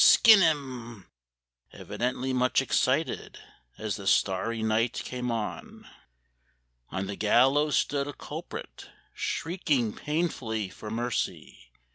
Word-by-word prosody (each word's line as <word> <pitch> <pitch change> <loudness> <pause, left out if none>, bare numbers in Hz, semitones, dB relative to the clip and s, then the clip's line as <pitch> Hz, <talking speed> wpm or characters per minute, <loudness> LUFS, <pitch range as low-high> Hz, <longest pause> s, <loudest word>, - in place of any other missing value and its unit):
skin 220 -4 +8
him!" 130 - -1 0.7
Evidently 130 +2 -3
much 125 0 +2
excited 135 +2 0 0.4
As 110 -3 -3
the 100 - -7
starry 105 +4 +1
night 110 +2 +1
came 125 -1 -4
on. 115 -3 -5 1.0
On 95 0 -3
the 100 +1 -5
gallows 135 +8 +3
stood 140 -1 0
a 145 - -5
culprit - - -8 0.2
Shrieking 145 - -1
painfully 130 - -2
for 105 +3 -9
mercy. 115 - -3
125 Hz, 105 wpm, -28 LUFS, 110-140 Hz, 1.0 s, skin